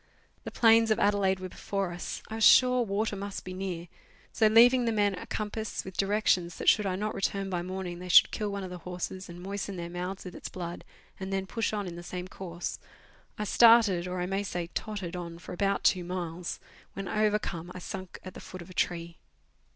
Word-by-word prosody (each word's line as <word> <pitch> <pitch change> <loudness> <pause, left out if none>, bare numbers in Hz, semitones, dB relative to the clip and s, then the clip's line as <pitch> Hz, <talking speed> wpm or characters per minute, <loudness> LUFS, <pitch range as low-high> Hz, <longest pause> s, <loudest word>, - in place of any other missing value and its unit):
The - - -3
plains 225 -1 +5
of 215 - +3
Adelaide 200 -2 +2
were 185 - -5
before 195 0 -3
us. 175 0 -5
I - - -8
was 225 0 -1
sure 250 +2 +7
water 215 -1 -1
must 200 0 -6
be 185 - -6
near; 185 -2 -4 0.5
so 220 - +4
leaving 240 +3 +6
the 230 - +2
men 205 -2 +2
a 180 - -7
compass, 215 0 -3
with 190 -1 -8
directions 195 -4 +1
that - - -6
should 210 -2 +5
I 185 - 0
not 210 +3 -2
return 195 0 -1
by 175 -1 -1
morning 180 -1 -5
they 180 0 -7
should - - +8
kill 210 -1 -2
one 200 -1 -4
of 185 - -6
the 180 - -7
horses 180 +2 -5
and 175 0 -9
moisten 200 +1 -4
their 170 -1 -5
mouths 180 +2 -5
with 180 - -7
its - - -7
blood, 175 -1 -6 0.4
and 190 0 -5
then 195 0 -1
push 225 +3 -1
on 210 -2 -2
in 175 -2 -6
the - - -6
same 180 +1 -6
course, 175 -2 -6 0.6
I 210 - -2
started, 215 -5 +6
or 180 0 -3
I - - 0
may 195 +2 -1
say, 175 -3 -4
tottered 195 -5 -4
on 170 -1 -6
for 180 - -9
about 195 +2 0
two 180 -2 +3
miles, 175 -1 -4 0.3
when 195 -1 -5
overcome 210 -5 0
I - - -5
sunk 185 +1 -7
at 185 - -8
the - - -9
foot 185 -2 -9
of 185 - -14
a - - -10
tree. 170 0 -2
190 Hz, 220 wpm, -29 LUFS, 180-205 Hz, 0.6 s, should